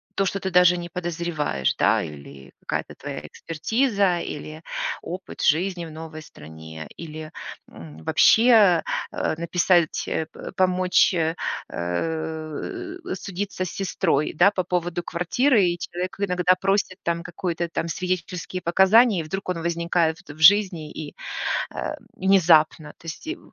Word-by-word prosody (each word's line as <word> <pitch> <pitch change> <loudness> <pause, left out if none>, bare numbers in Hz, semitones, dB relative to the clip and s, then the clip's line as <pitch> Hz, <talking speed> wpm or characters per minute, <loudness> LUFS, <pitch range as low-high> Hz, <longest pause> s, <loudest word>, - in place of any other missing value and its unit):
то, 195 - +1
что 195 +1 -1
ты 190 0 -3
даже 180 0 +5
не 175 0 -6
подозреваешь, 170 - -2
да. - - +3
Или 70 -3 -10
какая-то - - -3
твоя - - -6
экспертиза, 200 - 0
или 155 0 -6 0.4
опыт 180 +2 -7
жизни 175 +3 +1
в 160 - -9
новой 155 0 -8
стране, 80 - -11
или 155 -1 -7 0.4
м 80 -1 -11
вообще, 220 - +5 0.3
э - - -1
написать, 170 0 +2
э 160 - -1
пэ - - -9
помочь, 185 0 +3
э 165 -1 0 0.3
э, 160 - -4 0.2
судиться 195 -1 -4
с - - -4
сестрой, 180 -5 0
да, 180 +5 +5
по 185 -2 -1
поводу 175 -1 -1
квартиры, 210 - +2
и 175 0 0
человек 180 +3 -5
иногда 180 -2 +3
просит 195 -1 +1
там 170 0 -1
какой-то 175 -1 -3
там 170 - -2
свидетельские 180 +1 -3
показания, 190 +5 +5
и - - -6
вдруг 190 +4 -5
он 170 -2 -2
возникает 170 -1 0
вт - - -20
в 150 - -14
жизни 175 -3 +5
и, 150 -2 -8 0.6
э, - - -3 0.2
внезапно, 165 -5 +4
то 165 - -16
есть 165 - -7
и 330 +3 -4
175 Hz, 145 wpm, -24 LUFS, 160-185 Hz, 0.6 s, даже